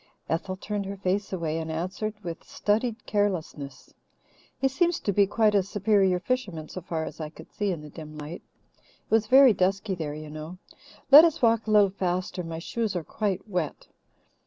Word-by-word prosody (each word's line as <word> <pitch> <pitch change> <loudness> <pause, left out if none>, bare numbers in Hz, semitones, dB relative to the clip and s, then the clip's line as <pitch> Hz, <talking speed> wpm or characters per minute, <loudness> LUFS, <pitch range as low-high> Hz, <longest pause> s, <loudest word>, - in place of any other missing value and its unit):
Ethel 185 +3 -2
turned 205 0 -4
her 200 0 -5
face 195 +2 -1
away 165 -4 -2
and 160 0 -5
answered 185 +6 -3
with 170 -1 -6
studied 225 +3 -1
carelessness. 170 -9 -2 0.6
"He 270 - +2
seems 340 +5 +1
to 200 - -1
be 200 +1 +4
quite 215 +1 +2
a 200 - +4
superior 195 -1 +2
fisherman 185 -9 -3
so 185 - -6
far 165 -2 -3
as - - -8
I 155 - -4
could 155 - -14
see 205 -1 -2
in 170 -4 -4
the 150 - -10
dim 155 -1 -10
light. 150 +3 -7 0.4
It - - -33
was 220 -1 +3
very 265 0 +7
dusky 195 +2 0
there, 155 -4 -4
you 155 0 -8
know. 155 +4 -8 0.5
Let 295 +3 +12
us 330 -6 +1
walk 225 -1 +3
a - - -2
little 205 -2 +5
faster. 185 -1 -2
My 165 -1 -5
shoes 215 +4 -3
are 175 - -2
quite 205 +3 -3
wet." 180 -7 -3
190 Hz, 190 wpm, -27 LUFS, 165-215 Hz, 0.6 s, Let